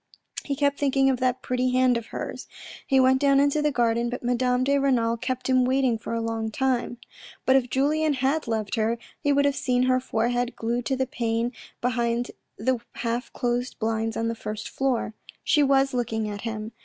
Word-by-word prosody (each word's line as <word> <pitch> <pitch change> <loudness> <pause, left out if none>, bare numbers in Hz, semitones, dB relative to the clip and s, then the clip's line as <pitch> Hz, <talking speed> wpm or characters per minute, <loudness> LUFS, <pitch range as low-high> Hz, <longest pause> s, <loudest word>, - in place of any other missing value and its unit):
He 280 - -2
kept 280 0 +1
thinking 270 -1 +3
of 255 - -2
that 255 0 0
pretty 255 0 0
hand 255 -1 +4
of 235 -1 -3
hers. - - -6 0.4
He 270 -2 +4
went 260 +1 +4
down 275 -1 +4
into 285 +2 +2
the 300 - +2
garden, 235 -2 +1
but 250 +1 -5
Madame 250 +1 +1
de 280 +1 +2
Renal 240 -4 +2
kept 255 +2 -3
him 255 -1 +4
waiting 260 -1 +2
for 230 - -4
a 230 - -1
long 225 -1 -2
time. 250 0 -1 0.5
But 260 - +5
if 255 -2 +2
Julien 300 +4 +1
had 270 +3 0
loved 220 -2 -2
her, 225 +1 +1 0.2
he 290 - +1
would 285 0 +3
have 285 -1 +2
seen 250 -2 +1
her 255 0 +3
forehead 245 0 -1
glued 235 +2 -2
to 270 - +1
the 260 0 0
pane 235 -1 -1 0.3
behind 240 -1 0 0.3
the 260 -2 0
half 235 +2 -3
closed 245 0 -2
blinds 225 0 -1
on 230 - 0
the 230 - -1
first 215 -1 -6
floor. 260 -5 -1 0.3
She 300 - +3
was 275 -1 +3
looking 225 -3 -1
at 205 -1 -5
him. 220 -1 -5
250 Hz, 200 wpm, -25 LUFS, 230-270 Hz, 0.5 s, But